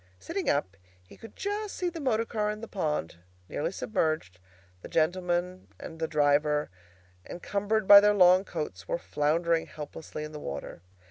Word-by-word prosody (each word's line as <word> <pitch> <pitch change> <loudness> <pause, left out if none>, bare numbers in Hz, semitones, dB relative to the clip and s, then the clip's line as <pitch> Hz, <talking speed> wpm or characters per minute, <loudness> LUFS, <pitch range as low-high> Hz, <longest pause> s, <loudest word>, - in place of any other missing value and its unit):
Sitting 385 - -3
up, 100 -10 0 0.3
he - - -14
could 225 - -13
just 410 +1 -3
see 360 - -2
the 340 -1 -4
motor 230 -6 +1
car 210 -2 -1
in 210 0 -4
the 230 - -7
pond, 150 - -2 0.3
nearly 160 - -2
submerged; 155 - -2 0.4
the - - -8
gentlemen 180 +2 -1
and 160 - -9
the 160 - -1
driver, 150 - +2 0.6
encumbered 205 +3 -1
by 200 - +12
their 210 0 +4
long 185 -1 +6
coats, 160 -6 -6
were - - -1
floundering 165 - 0
helplessly 150 0 -8
in 150 - -7
the 150 - -7
water. 70 - -7
175 Hz, 160 wpm, -28 LUFS, 150-210 Hz, 0.6 s, by